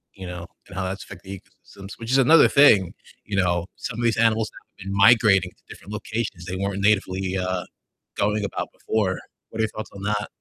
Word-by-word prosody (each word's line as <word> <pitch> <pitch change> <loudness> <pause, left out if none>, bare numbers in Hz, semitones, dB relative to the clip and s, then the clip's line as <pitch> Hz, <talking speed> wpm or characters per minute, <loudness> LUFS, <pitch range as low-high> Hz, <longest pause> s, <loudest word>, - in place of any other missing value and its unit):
You 95 -1 -8
know, 90 -1 -7 0.2
and - - -11
how 95 - -1
that's 95 +2 -4
affecting 95 +1 -11
the 95 - -7
ecosystems, 100 0 -14
which 115 +1 -6
is 135 - +4
another 155 +5 +7
thing, 110 -11 +5 0.3
you 100 - -4
know, 90 -3 +1
some 120 - -6
of - - -2
these 115 -1 +2
animals 110 -1 +2 0.3
have - - -10
been 95 - -3
migrating 100 -3 +5
to - - -33
different 100 - -12
locations 105 -4 -4
they 90 0 -4
weren't 100 +1 -2
natively, 95 -2 +1
uh, 90 -1 -2 0.5
going 105 0 0
about 100 - -4
before. 100 -4 -1 0.3
What 110 - -9
are - - +3
your 110 - 0
thoughts 110 0 -7
on 100 -1 -9
that? 105 0 -1
100 Hz, 215 wpm, -23 LUFS, 95-110 Hz, 0.5 s, another